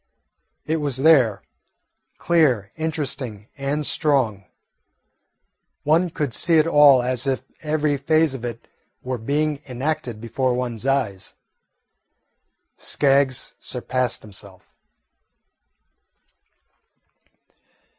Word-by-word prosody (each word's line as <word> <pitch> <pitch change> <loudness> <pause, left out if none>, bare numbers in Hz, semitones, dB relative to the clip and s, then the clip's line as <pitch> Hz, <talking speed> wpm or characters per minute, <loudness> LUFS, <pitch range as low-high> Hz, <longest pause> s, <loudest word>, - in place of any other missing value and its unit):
It 160 +1 0
was 145 -4 -2
there 135 -7 +4 0.7
clear, 135 - +2
interesting, 140 -9 -4
and 145 +2 -2
strong. 130 -12 0 1.4
One 165 +4 +2
could 150 -6 -3
see 170 +5 +3
it 155 - +4
all 145 -5 +6
as 130 +1 -1
if 130 -1 -1 0.2
every 150 -2 0
phase 155 +1 +2
of 130 -3 -7
it 120 -1 -6 0.4
were 125 -1 -3
being 145 +4 -1
enacted 125 -3 -3
before 125 +3 -1
one's 125 -1 -3
eyes. 110 -9 -1 1.4
Skaggs 135 -2 +1
surpassed 125 0 -2
himself. 100 -2 -13
135 Hz, 90 wpm, -22 LUFS, 120-150 Hz, 1.4 s, all